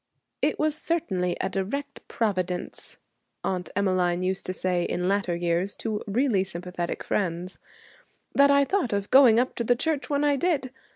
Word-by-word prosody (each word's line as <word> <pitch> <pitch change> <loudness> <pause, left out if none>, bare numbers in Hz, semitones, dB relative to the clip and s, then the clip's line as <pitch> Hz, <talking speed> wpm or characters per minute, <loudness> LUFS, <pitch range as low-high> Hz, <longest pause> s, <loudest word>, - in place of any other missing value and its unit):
'It - - +1
was 310 0 +1
certainly 190 - -1
a - - 0
direct 255 +10 -4
Providence,' 185 -5 -3 0.5
Aunt 180 -1 -2
Emmeline 185 -3 +1
used 185 +1 -2
to - - -1
say 185 -1 -1
in 180 +1 -1
later 195 -3 +1
years 175 +3 -1
to 215 -2 -3
really 215 -2 +2
sympathetic 180 -1 -4
friends, 180 -2 -2 0.7
'that 280 0 +5
I 280 0 +5
thought 350 - 0
of 200 0 -2
going 250 -4 +7
up 255 - 0
to 235 - 0
the 245 +2 +3
church 300 +2 -1
when 285 0 +1
I 290 -1 +3
did. 280 -5 0
200 Hz, 165 wpm, -26 LUFS, 180-275 Hz, 0.7 s, going